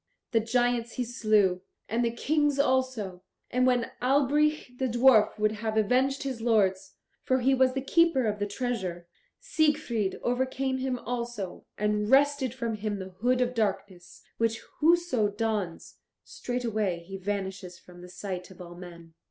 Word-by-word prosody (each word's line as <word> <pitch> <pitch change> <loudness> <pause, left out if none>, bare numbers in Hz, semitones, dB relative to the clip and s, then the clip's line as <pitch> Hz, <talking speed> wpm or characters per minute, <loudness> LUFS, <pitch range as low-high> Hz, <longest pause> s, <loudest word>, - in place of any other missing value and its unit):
The 230 - +3
giants 240 +1 0
he 250 - -2
slew, 215 -6 +2 0.3
and 230 +3 0
the 235 - +2
Kings 290 +4 0
also, 255 -9 0 0.3
and 255 +1 +2
when 245 -2 +1
Albrich 280 0 +1
the 260 - +1
dwarf 240 -3 +4
would 215 0 +2
have 220 0 -3
avenged 255 +6 +2
his 260 -4 -4
lords 195 -4 +1 0.3
for 260 0 +1
he 265 +2 +3
was 260 -1 +3
the 270 0 -3
keeper 330 -4 +3
of 210 -1 -1
the 205 - -1
treasure 200 -7 -3 0.3
Siegfried 300 - 0
overcame 260 +1 -1
him 260 -1 -1
also, 235 -6 -5
and 210 0 0
wrested 275 -1 +3
from 235 -3 -3
him 210 0 -3
the 190 -1 -7
Hood 245 +7 0
of 250 0 0
Darkness, 195 -5 -3 0.2
which 225 -1 0 0.2
whoso 325 -8 +3
dons, 205 -5 -3 0.3
straightway 220 -8 -2
he 195 +3 -8
vanishes 190 -2 -4
from 180 -1 -15
the 180 - -11
sight 185 -1 -6
of 190 - -15
all 175 -1 -9
men. 170 -2 -12
230 Hz, 155 wpm, -28 LUFS, 200-260 Hz, 0.3 s, dwarf